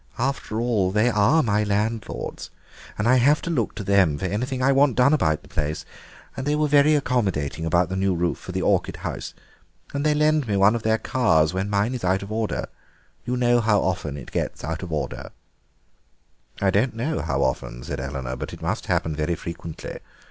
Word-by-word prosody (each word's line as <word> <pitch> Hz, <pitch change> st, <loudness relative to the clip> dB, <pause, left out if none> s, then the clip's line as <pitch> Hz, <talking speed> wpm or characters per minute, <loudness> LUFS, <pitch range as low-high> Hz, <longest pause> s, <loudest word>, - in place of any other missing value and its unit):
After 125 Hz, -3 st, -2 dB
all, 115 Hz, -6 st, +1 dB
they 105 Hz, +5 st, +2 dB
are 110 Hz, +10 st, +4 dB
my 105 Hz, -2 st, +1 dB
landlords 105 Hz, +2 st, -2 dB, 0.5 s
and 105 Hz, -, 0 dB
I 130 Hz, +2 st, +5 dB
have 145 Hz, +5 st, +4 dB
to 170 Hz, -, -2 dB
look 120 Hz, -10 st, -1 dB
to 100 Hz, -, -5 dB
them 95 Hz, -7 st, +3 dB
for 95 Hz, -, -4 dB
anything 125 Hz, +8 st, -2 dB
I 135 Hz, -, +4 dB
want 135 Hz, -1 st, +4 dB
done 130 Hz, +4 st, +4 dB
about 80 Hz, -, +1 dB
the -, -, -16 dB
place; 75 Hz, +1 st, -3 dB, 0.5 s
they 145 Hz, +3 st, -1 dB
were 150 Hz, 0 st, +2 dB
very 145 Hz, +1 st, +5 dB
accommodating 95 Hz, -, -1 dB
about 85 Hz, +2 st, +2 dB
the 95 Hz, -, -3 dB
new 95 Hz, -1 st, +1 dB
roof 85 Hz, 0 st, -1 dB
for -, -, -8 dB
the -, -, -2 dB
orchid -, -, +1 dB
house. -, -, -5 dB, 0.6 s
And 140 Hz, 0 st, -1 dB
they 150 Hz, -1 st, +2 dB
lend 150 Hz, -2 st, +2 dB
me 100 Hz, -2 st, 0 dB
one 100 Hz, +2 st, +5 dB
of 115 Hz, -, -2 dB
their 110 Hz, 0 st, +2 dB
cars 80 Hz, -12 st, +2 dB
when 95 Hz, +2 st, -2 dB
mine 105 Hz, +4 st, +1 dB
is 125 Hz, -, -5 dB
out 95 Hz, +2 st, +1 dB
of 100 Hz, -, -8 dB
order; 110 Hz, 0 st, -1 dB, 0.6 s
you 125 Hz, +1 st, -1 dB
know 120 Hz, -1 st, +3 dB
how 105 Hz, -2 st, +3 dB
often 80 Hz, -6 st, -2 dB
it -, -, -10 dB
gets -, -, -3 dB
out 80 Hz, +2 st, -3 dB
of 90 Hz, -3 st, -6 dB
order." 75 Hz, -, -3 dB, 1.3 s
"I 95 Hz, -1 st, +2 dB
don't 110 Hz, +5 st, +1 dB
know 145 Hz, +8 st, -1 dB
how 70 Hz, 0 st, 0 dB
often," -, -, -2 dB
said -, -, -5 dB
Eleanor, 65 Hz, -1 st, -4 dB
"but -, -, -6 dB
it -, -, -10 dB
must -, -, -2 dB
happen 80 Hz, -1 st, 0 dB
very 80 Hz, +3 st, -1 dB
frequently. 85 Hz, -1 st, -7 dB
105 Hz, 205 wpm, -24 LUFS, 85-125 Hz, 1.3 s, I